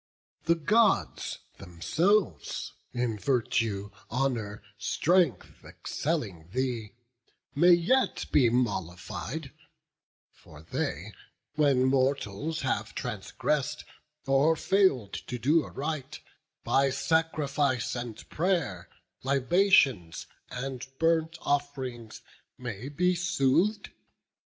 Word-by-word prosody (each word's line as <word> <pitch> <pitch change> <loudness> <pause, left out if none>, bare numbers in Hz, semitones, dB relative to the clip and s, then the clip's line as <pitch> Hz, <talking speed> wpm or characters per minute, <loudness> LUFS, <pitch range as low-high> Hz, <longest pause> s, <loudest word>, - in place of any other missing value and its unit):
The 170 +1 +4
Gods 210 +7 +2 0.2
themselves, 160 - 0 0.2
in 120 -3 -2
virtue, 110 -5 0 0.2
honour, 115 -5 -2
strength, 150 - +1
Excelling 105 - -4
thee, 120 -3 -2 0.6
may 175 +5 +6
yet 185 +11 +2
be 125 -5 +5
mollified; 100 -8 -2 0.8
For 75 0 -16
they, 80 - -3 0.4
when 140 -4 +3
mortals 135 +2 0
have 115 -5 -2
transgress'd, 135 +6 -2 0.4
or 140 +4 +4
fail'd 145 - +2
To 125 - -3
do 150 +7 +3
aright, 145 -1 -5 0.4
by 135 0 +3
sacrifice 145 -5 0
and 120 -3 -6
pray'r, 150 - -1 0.3
Libations 135 - +3 0.2
and 130 0 -5
burnt 165 0 +1
off'rings, 130 -6 -3 0.3
may 120 0 -6
be 180 +5 +2
sooth'd. 175 +4 +1
135 Hz, 85 wpm, -28 LUFS, 115-160 Hz, 0.8 s, may